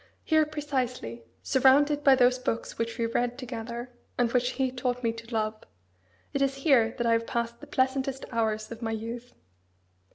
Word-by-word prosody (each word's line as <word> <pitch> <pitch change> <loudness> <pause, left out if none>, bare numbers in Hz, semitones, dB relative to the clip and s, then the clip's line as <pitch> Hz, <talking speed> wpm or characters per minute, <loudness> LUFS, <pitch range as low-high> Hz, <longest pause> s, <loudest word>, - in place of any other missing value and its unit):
Here, 315 -2 +3
precisely 260 - -3 0.2
surrounded 285 +3 +4
by 275 -1 +7
those 250 0 +4
books 230 -2 -3
which 230 0 -2
we 230 - +1
read 240 +1 0
together, 240 -1 -6 0.3
and 240 -1 +2
which 250 +1 +1
he 265 -1 0
taught 250 -1 -2
me 230 -1 +1
to 230 +1 -11
love 215 -1 -1 0.7
it 280 - 0
is 275 0 +2
here 235 -6 +4
that 240 - -1
I 230 - +3
have 230 0 +2
passed 235 0 -2
the 295 - -11
pleasantest 265 -1 0
hours 220 -2 -1
of 230 0 -7
my 225 -1 -2
youth. 230 +2 -6
245 Hz, 175 wpm, -28 LUFS, 230-265 Hz, 0.7 s, by